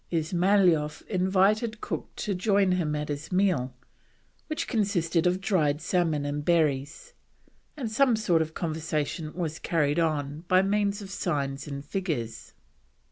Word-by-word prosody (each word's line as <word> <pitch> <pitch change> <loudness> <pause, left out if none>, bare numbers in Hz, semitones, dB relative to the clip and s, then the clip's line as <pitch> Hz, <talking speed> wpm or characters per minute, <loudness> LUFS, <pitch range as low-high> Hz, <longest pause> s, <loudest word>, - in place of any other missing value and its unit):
Ismailoff 170 -1 +2
invited 200 +4 +1
Cook - - -5
to 205 - -2
join 195 0 +2
him 165 -5 0
at 150 0 -3
his 145 +4 -5
meal, 180 -10 +1 0.7
which 310 - -3
consisted 180 - +1
of 180 +1 +1
dried 160 -7 +1
salmon 160 -3 0
and 145 +1 -2
berries, 155 - 0 0.6
and 240 -6 -3
some 250 +1 +4
sort 175 -7 +2
of 160 0 -4
conversation 155 -1 -2
was 165 -3 -3
carried 150 -2 +1
on 150 -3 -1
by 185 +1 +4
means 205 0 0
of 195 - -9
signs 140 -7 -2
and 140 -1 -6
figures. 145 - -4
170 Hz, 135 wpm, -27 LUFS, 150-195 Hz, 0.7 s, some